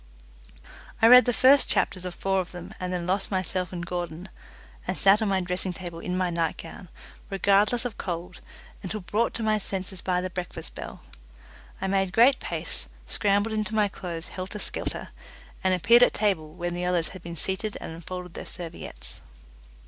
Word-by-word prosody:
I - - +5
read 250 +2 +10
the 245 - +3
first 260 +3 +5
chapters 185 -2 +1
of 180 -1 -5
four 195 0 +1
of 180 - -3
them, 180 +3 -8
and 180 0 -3
then 180 -1 -2
lost 195 +2 0
myself 185 -1 -1
in 175 -2 -4
Gordon, 175 +1 -4 0.6
and - - -1
sat 195 +3 +5
on 220 - +1
my 190 -1 +2
dressing 180 +1 -2
table 175 -2 -7
in 180 +2 -3
my 185 -1 +1
nightgown, 170 +1 -3 0.4
regardless 200 +5 +3
of 235 -4 -4
cold, 180 0 -5 0.4
until 210 +2 -4
brought 215 +6 0
to 230 - -3
my 215 -1 +2
senses 190 -2 -3
by 180 -1 +1
the 185 0 -3
breakfast 180 0 -6
bell. - - -8 0.8
I - - -2
made 190 -1 +1
great 255 +4 +6
pace, - - -2 0.2
scrambled 205 +1 +1
into 215 0 -2
my 210 -1 +4
clothes 170 -3 -6
helter 185 +3 -6
skelter, - - -4 0.5
and 190 - +3
appeared 230 +7 +6
at 245 - +5
table 185 -8 0
when 175 +1 -4
the 175 +1 -2
others 175 -2 +2
had 185 - -10
been 170 -1 -7
seated 190 +6 -2
and - - -6
unfolded 180 +1 -7
their - - -7
serviettes. 170 -2 -4
185 Hz, 180 wpm, -27 LUFS, 175-205 Hz, 0.8 s, read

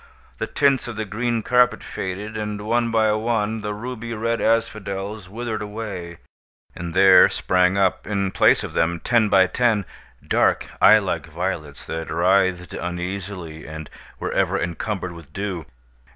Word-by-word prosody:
The - - -2
tints 140 -3 +2
of 120 - -6
the 110 0 -3
green 115 +2 -1
carpet 125 +1 +3
faded; 100 +4 -5
and, 105 -1 -3
one 115 +2 +1
by 110 -1 +3
one, 110 0 0
the 105 0 -3
ruby 115 +1 -5
red 115 +1 -1
asphodels 105 -3 -1
withered 110 +1 -4
away; 105 -5 -6 0.6
and 85 -1 -6
there 95 -1 +7
sprang 90 +1 +2
up, 95 -2 +1
in 100 -2 -1
place - - +4
of - - -6
them, 85 +1 +1
ten 115 +2 +2
by 95 -2 +6
ten, 110 0 +1 0.4
dark, - - +2 0.2
eye 110 - +8
like 90 -7 -2
violets, 80 -3 -4
that 80 0 -5
writhed 90 +1 +2
uneasily 90 -2 -5
and 80 0 -8 0.3
were - - -3
ever - - +1
encumbered 90 +2 -3
with 85 -4 -12
dew. 95 -4 -4
100 Hz, 150 wpm, -22 LUFS, 90-110 Hz, 0.6 s, eye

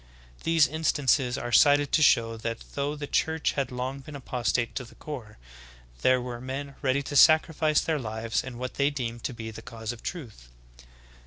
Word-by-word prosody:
These 165 -2 +4
instances 140 -4 +1
are 120 - -4
cited 145 +1 +5
to 155 - +3
show 115 -5 +4
that 115 +1 -5
though 145 +1 -2
the 145 -1 -5
Church 160 +2 0
had 135 -3 -2
long 130 +2 -4
been 145 +2 -10
apostate 120 -3 -1
to 130 - -4
the 120 - -15
core, 125 -9 -8 0.6
there 130 0 +4
v/ere 120 -1 -6
men 135 +2 -5
ready 140 0 +1
to 145 - -6
sacrifice 155 0 +5
their 160 -2 -1
lives 110 -1 -2
in 125 -2 -8
what 125 +1 -5
they 140 - +4
deemed 120 -5 -5
to 130 - -2
be 110 -1 -6
the 110 - -9
cause 110 -1 -6
of 120 - -10
truth. 115 - -7
130 Hz, 185 wpm, -27 LUFS, 120-145 Hz, 0.6 s, cited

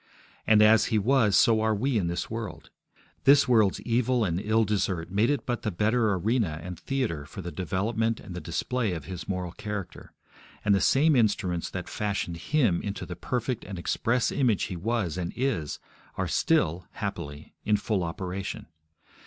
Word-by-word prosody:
And, 105 -1 +6
as 110 0 +6
He 110 - +1
was, 110 -2 +3
so 110 -2 +5
are 110 0 +2
we 130 +5 0
in 90 - -1
this 85 0 -2
world. 100 -9 -6 0.5
This 140 0 +6
world's 110 -6 +3
evil 120 0 +1
and 85 -1 -1
ill 110 +3 +2
desert 95 -5 -1
made 105 +5 +2
it 145 - 0
but 120 -2 -2
the 105 - -1
better 110 +3 +2
arena 95 -4 0
and 90 -2 -7
theatre 125 - -2
for 95 - -8
the 85 - -5
development 110 +6 -1
and 95 - -9
the 90 - -5
display 110 +5 -1
of 80 -5 -6
His 90 -1 -7
moral 90 -2 -3
character; 105 -1 -6 0.5
and 105 - +4
the 95 - +3
same 145 +8 +4
instruments 100 -7 +1
that - - -5
fashioned 100 -5 -2
Him 105 - +1
into 100 -1 -4
the 90 - -6
perfect 120 +7 -2
and 95 -1 -7
express 115 +7 0
image 125 -7 +2
He 95 - -3
was 95 -2 -1
and 85 -1 -3
is, 120 - -1 0.4
are - - -1
still, 85 +3 +1
happily, 75 +1 -6
in 105 -1 +3
full 100 -3 -1
operation. 90 +3 -4
105 Hz, 180 wpm, -27 LUFS, 90-115 Hz, 0.5 s, And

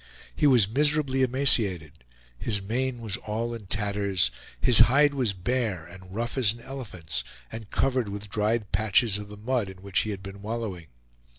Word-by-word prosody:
He 150 - +3
was 120 -8 +5
miserably 140 +2 +1
emaciated; 110 - +2 0.3
his 100 - -1
mane 120 +5 -2
was 110 -3 -3
all 115 +2 -3
in 110 -4 -8
tatters; 100 - 0 0.3
his 125 - +6
hide 145 +3 +4
was 125 -7 0
bare 100 -3 -2
and 95 +2 -12
rough 120 +3 -2
as 110 -4 +3
an 120 - -13
elephant's, 90 - -6 0.3
and 110 -2 -8
covered 130 -5 0
with 100 +1 -6
dried 105 +1 -1
patches 105 +1 +2
of 105 -1 -9
the 105 - -10
mud 115 -1 -1
in 95 0 -12
which 100 -2 +1
he 110 - -1
had 100 -2 -5
been 100 0 -9
wallowing. 105 -6 -5
105 Hz, 175 wpm, -26 LUFS, 95-125 Hz, 0.3 s, his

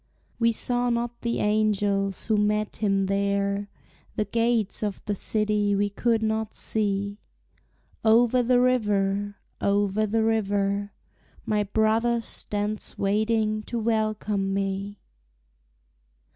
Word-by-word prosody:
We 230 0 +4
saw 245 +2 0
not 235 0 -2
the 235 0 -1
angels 205 -2 +1
who 220 - +2
met 210 0 0
him 195 -2 +1
there, 200 +1 0 0.5
The 210 - 0
gates 230 -3 0
of 205 -2 -2
the 205 - -1
city 210 0 +1
we 205 0 0
could 225 +2 +1
not 220 0 -1
see: 200 -1 -1 0.8
Over 235 +3 +4
the 245 +1 +3
river, 205 -5 +1 0.3
over 205 +1 +1
the 220 +2 +1
river, 205 -2 0 0.5
My 210 -1 +1
brother 220 +3 +1
stands 210 -1 -3
waiting 215 +1 +1
to 240 - -4
welcome 215 -3 0
me. 195 +1 -3
210 Hz, 115 wpm, -26 LUFS, 200-225 Hz, 0.8 s, We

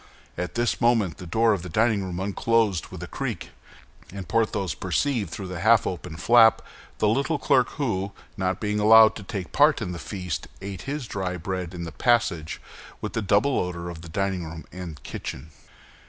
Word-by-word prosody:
At 90 - -4
this 120 +1 0
moment 115 -9 +2
the 90 - -9
door 110 +6 +3
of 100 - -2
the 90 - -7
dining 110 +2 +2
room 90 -1 -4
unclosed 100 -1 +1
with - - -8
a - - -6
creak, - - -5 0.6
and 95 -2 -7
Porthos 105 -2 0
perceived 105 - -1
through 100 +3 -6
the 90 -2 -5
half 110 +4 +5
open 90 -2 -4
flap 115 +5 +5 0.3
the 105 - +2
little 140 +8 +1
clerk 130 -2 +3
who, 100 -9 -2 0.2
not 95 -1 -1
being 105 -1 -1
allowed 110 +1 +8
to - - -8
take 95 -2 -6
part 150 +2 +4
in 105 -6 -4
the 85 - -6
feast, 90 -6 -5
ate 100 -1 -6
his 145 -2 -3
dry 95 -4 -3
bread 90 0 -4
in 85 - -5
the 80 - -6
passage 100 - +1 0.4
with - - -5
the 115 - -1
double 105 +7 +2
odor 85 -1 -3
of 80 -2 -9
the 85 - -10
dining 95 0 -1
room 80 0 -8
and 85 -5 -8
kitchen. 80 +5 -7
100 Hz, 190 wpm, -25 LUFS, 90-115 Hz, 0.6 s, allowed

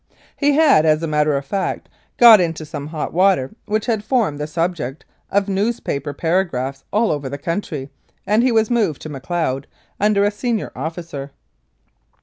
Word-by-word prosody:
He 290 0 +2
had, 290 - +5
as 155 0 +2
a - - 0
matter 150 -1 +2
of 140 - -5
fact, 190 +6 -3 0.3
got 230 -4 +9
into 165 -2 -2
some 145 -1 -6
hot 155 -1 -4
water 180 -7 +3 0.2
which 215 0 0
had 220 -3 -1
formed 220 - 0
the 150 - -3
subject 165 -4 -3 0.2
of 200 0 +1
news 205 +4 0
paper 140 +1 -3
paragraphs 145 -5 -1
all 220 +2 +2
over 145 -3 -3
the 140 - -5
country, 155 -3 -4 0.3
and 210 +3 +3
he 255 +1 +3
was 225 0 +2
moved 215 - 0
to 155 - -6
Macleod 140 -1 -3 0.3
under 205 0 +3
a 205 - +2
senior 225 +1 -2
officer. 160 -1 -6
170 Hz, 170 wpm, -20 LUFS, 145-210 Hz, 0.3 s, got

